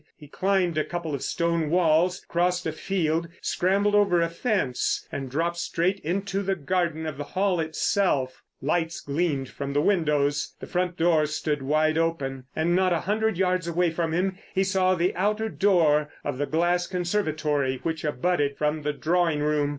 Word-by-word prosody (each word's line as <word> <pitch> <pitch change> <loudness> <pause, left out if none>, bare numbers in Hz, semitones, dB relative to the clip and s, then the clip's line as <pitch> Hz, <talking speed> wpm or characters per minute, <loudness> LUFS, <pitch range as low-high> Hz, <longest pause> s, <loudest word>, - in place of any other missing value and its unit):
He 150 - -13
climbed 185 0 +1
a - - +2
couple 170 -3 -4
of 140 - -3
stone 170 -2 0
walls, 175 +1 +2
crossed 180 +1 0
a 160 - 0
field, 165 -1 -1
scrambled 200 +3 +1
over 200 -4 +4
a 170 0 +1
fence, 170 - -1
and 135 -2 -4
dropped 165 +5 -1
straight 180 +3 0
into 195 +4 -2
the 195 -1 0
garden 170 0 -1
of 155 -3 -4
the - - -2
Hall 185 +3 0
itself. 160 - 0 0.2
Lights 165 +3 -1
gleamed 140 -3 -1
from 140 0 -5
the 145 - +2
windows. 150 -5 +1
The - - -7
front 180 -1 -2
door 165 -2 +3
stood 150 -1 -2
wide 155 +3 +2
open, 135 -6 -2
and 170 +2 +1
not 185 -1 +3
a 165 - 0
hundred 215 0 0
yards 185 -2 +1
away 170 0 +1
from 165 0 -1
him 185 +3 -1 0.2
he 190 - +3
saw 190 -1 +2
the 180 +1 +1
outer 210 +4 0
door 160 -8 +3
of 145 -2 -3
the 145 - 0
glass 175 +2 +1
conservatory 155 -8 -1
which 160 -1 -2
abutted 145 -1 0
from 150 +1 0
the 150 0 -1
drawing 165 -1 +1
room. 150 -1 +1
170 Hz, 175 wpm, -26 LUFS, 150-185 Hz, 0.2 s, over